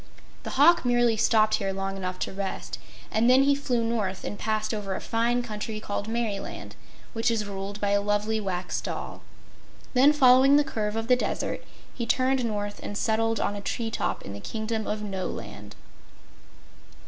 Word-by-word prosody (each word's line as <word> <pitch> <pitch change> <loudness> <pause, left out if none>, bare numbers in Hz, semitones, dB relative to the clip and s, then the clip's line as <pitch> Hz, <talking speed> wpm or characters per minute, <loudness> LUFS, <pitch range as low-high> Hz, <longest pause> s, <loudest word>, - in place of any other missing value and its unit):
The - - -6
hawk 335 +5 +6
merely 240 -2 +3
stopped 215 0 +3
here 195 -1 -2
long 195 0 -3
enough 185 -1 -4
to - - -2
rest, 195 0 -4 0.3
and 225 +3 +3
then 260 +2 +6
he 280 +1 +4
flew 255 -4 0
north 215 -5 -2
and 205 - -5
passed 215 0 -1
over 200 -3 -3
a - - -3
fine 240 +2 0
country 215 -1 -5
called 205 -1 -4
Merryland, 225 -3 -3 0.4
which 230 +1 +1
is 225 -2 0
ruled 200 0 -5
by 205 -1 0
a 200 0 +3
lovely 205 +2 0
Wax 185 -3 -3
Doll. - - -5 0.7
Then, 270 +3 +6
following 270 -1 +6
the 295 - +5
curve 215 -5 -3
of 225 0 -2
the 250 - +6
Desert, 250 - -2 0.3
he 235 -2 -4
turned 255 +2 +2
north 205 -2 -3
and 205 - -5
settled 225 0 +1
on 205 - -1
a 200 - -5
tree 225 +2 -3
top - - -2
in 100 - -7
the 100 - -7
Kingdom 220 - -3
of 210 0 -2
Noland. 115 - -6
220 Hz, 180 wpm, -27 LUFS, 200-240 Hz, 0.7 s, hawk